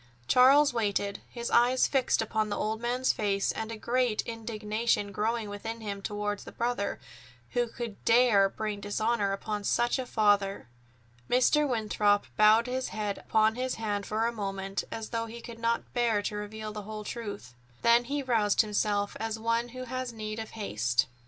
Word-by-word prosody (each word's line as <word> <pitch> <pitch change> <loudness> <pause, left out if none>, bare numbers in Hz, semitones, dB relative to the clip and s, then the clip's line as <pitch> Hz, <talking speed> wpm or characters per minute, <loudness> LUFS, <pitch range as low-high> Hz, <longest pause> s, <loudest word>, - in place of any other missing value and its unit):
Charles 275 +3 +6
waited, 205 -3 -1
his 235 -1 -5
eyes 245 +2 +4
fixed 260 -4 +2
upon 215 -1 -1
the 205 - -2
old 220 +1 -2
man's 250 +2 +1
face, 200 -2 0
and 220 0 -5
a 225 - -5
great 240 0 0
indignation 220 -2 -2
growing 220 +2 -1
within 225 +3 -6
him 200 -2 -5
toward 205 0 -3
the - - -10
brother 235 -3 -2 0.5
who 240 0 +1
could 230 -2 -7
dare 230 -4 +5
bring 210 0 -4
dishonor 205 +1 0
upon 205 +1 -3
such 240 +5 +1
a 255 - -4
father! 205 - +2 0.6
Mr. 285 +4 +3
Winthrop 210 -3 +2
bowed 215 +2 +6
his 255 +1 -2
head 210 -2 -3
upon 220 0 +2
his 255 +2 -2
hand 205 -3 -3
for 220 +2 0
a 235 - +1
moment, 195 -3 -3
as 225 -1 -5
though 230 -1 -2
he 235 +1 -8
could 230 -1 -10
not 230 0 -1
bear 230 -4 +1
to 210 - -3
reveal 215 +1 -5
the 210 - -5
whole 215 +1 -7
truth. 205 - -6 0.3
Then 235 +1 +5
he 285 +2 -2
roused 220 -5 +3
himself 205 -1 0
as 225 0 -2
one 230 +1 0
who 255 +1 -7
has 255 0 -4
need 215 -1 -5
of 220 - -5
haste. 120 - +1
220 Hz, 175 wpm, -29 LUFS, 205-235 Hz, 0.6 s, Charles